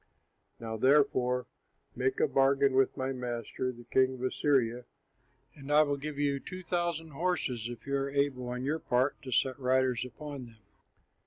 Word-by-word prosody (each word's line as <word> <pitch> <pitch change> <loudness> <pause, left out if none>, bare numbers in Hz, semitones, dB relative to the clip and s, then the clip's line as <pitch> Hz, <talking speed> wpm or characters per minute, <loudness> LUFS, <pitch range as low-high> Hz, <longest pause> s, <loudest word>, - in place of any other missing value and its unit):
Now 110 -1 -5
therefore 130 -1 +3 0.5
make 130 +1 0
a - - +4
bargain 135 0 +3
with 135 +1 +2
my 130 0 -1
master, 125 0 -3
the 120 -1 -13
king 130 +2 +2
of 125 - -8
Assyria, 125 -3 +1 0.7
and 140 0 -8
I 150 +1 +7
will 145 -1 0
give 145 +1 -6
you 140 -1 +1
two 185 +6 -8
thousand 170 -2 -2
horses, 140 -8 -1
if 120 -2 -9
you 140 0 -1
are 135 0 -1
able 140 -3 0
on 125 +1 -4
your 150 +4 0
part 130 +1 0
to 130 - -8
set 130 +3 +1
riders 130 -1 +2
upon 140 +1 -7
them. 115 -2 -16
130 Hz, 170 wpm, -31 LUFS, 125-145 Hz, 0.7 s, I